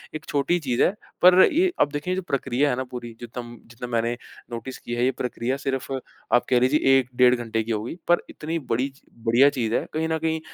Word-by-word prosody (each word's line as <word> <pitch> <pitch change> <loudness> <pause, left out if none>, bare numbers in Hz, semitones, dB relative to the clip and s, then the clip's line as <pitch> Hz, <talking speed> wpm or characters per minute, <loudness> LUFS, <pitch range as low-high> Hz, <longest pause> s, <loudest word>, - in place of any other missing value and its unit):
एक 155 - -6
छोटी 145 +5 +1
चीज़ 130 -5 +1
है, - - +4 0.3
पर 180 +1 +8
ये 360 +3 +3
अब 145 - +3
देखिए 150 +6 -2
जो 190 - -2
प्रक्रिया 140 -3 0
है 125 - +1
ना 130 - -2
पूरी, 120 -2 -7
जितना-जितना 120 0 -9
मैंने 115 0 +1 0.4
नोटिस 120 +3 -6
की 120 - -7
है, 120 - 0
ये 130 - +3
प्रक्रिया 125 +1 -3
सिर्फ़ 135 -1 -3 0.4
आप 120 - +4
कह 125 -1 +4
लीजिए 135 +1 +4
1 125 -1 -4
डेढ़ 125 0 +6
घंटे 115 -2 -2
की 115 - -4
होगी, 110 +7 -3
पर 175 - +4
इतनी 165 +2 -4
बड़ी 130 0 -1
च 135 +1 -22 0.3
बढ़िया 135 +4 +6
चीज़ 115 -5 -2
है - - 0
कहीं 160 +1 0
न 160 - +1
कहीं, 160 0 -1
130 Hz, 220 wpm, -24 LUFS, 120-150 Hz, 0.4 s, पर